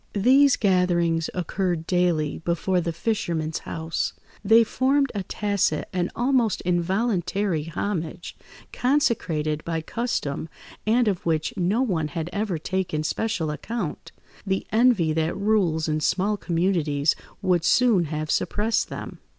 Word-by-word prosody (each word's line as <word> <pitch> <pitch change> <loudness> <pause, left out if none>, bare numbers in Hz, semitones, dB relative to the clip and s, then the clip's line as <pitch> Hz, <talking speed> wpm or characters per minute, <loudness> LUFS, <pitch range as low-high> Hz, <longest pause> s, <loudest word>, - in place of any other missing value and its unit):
These 265 +6 +5
gatherings 175 -4 +2
occurred 180 -1 -1
daily 175 -5 +1
before 175 +2 0
the 170 0 -2
fisherman's 165 -4 -2
house; 160 0 -3 0.3
they 225 +3 +6
formed 275 +4 +1
a 205 - -2
tacit 200 -4 -1
and 180 -1 0
almost 245 -3 +2
involuntary 185 -1 0
homage, 170 0 -4 0.4
consecrated 165 - 0
by 165 -1 -2
custom, 165 - -3 0.4
and 235 +2 +3
of 195 -4 0
which 160 -2 0
no 200 +6 +1
one 170 -11 0
had 160 +3 -5
ever 205 -4 -1
taken 175 -1 -2
special 165 -1 -1
account; 185 +2 -5 0.3
the 190 -1 -1
envy 220 -9 +3
that 160 +1 -1
rules 195 -6 +1
in 155 0 0
small 195 +7 +1
communities 165 -6 +1 0.3
would 180 -3 +2
soon 220 -3 +4
have 155 0 -3
suppressed 220 +2 0
them. - - -7
180 Hz, 125 wpm, -24 LUFS, 160-215 Hz, 0.4 s, they